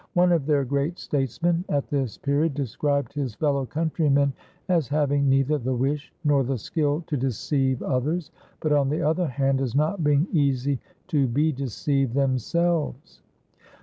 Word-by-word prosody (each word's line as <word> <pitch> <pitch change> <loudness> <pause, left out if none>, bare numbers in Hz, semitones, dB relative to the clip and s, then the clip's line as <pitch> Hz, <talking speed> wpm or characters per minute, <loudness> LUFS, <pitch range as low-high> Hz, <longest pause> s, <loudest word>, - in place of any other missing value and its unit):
One 180 -1 +4
of 160 -5 +1
their 145 -3 +2
great 140 +6 -1
statesmen 150 +6 -1
at 145 -1 0
this 135 -6 -1
period 140 +1 0
described 140 0 -1
his 135 -6 -3
fellow 140 -1 0
countrymen 150 -3 +1 0.3
as 170 -7 +2
having 145 0 +1
neither 135 +3 +2
the 130 +1 -1
wish 140 +4 -1
nor 145 -3 +3
the 130 +1 -1
skill 150 +6 -1
to 150 - -2
deceive 130 0 0
others, 150 +6 -1 0.3
but 155 - 0
on 140 -2 +3
the 150 - -1
other 160 +4 +1
hand 135 0 0
as 130 -2 -2
not 155 +5 +1
being 145 +1 +3
easy 140 - +1 0.3
to 140 -3 +2
be 145 +6 +2
deceived 135 -1 -1
themselves. 140 - 0
140 Hz, 155 wpm, -25 LUFS, 135-155 Hz, 0.3 s, One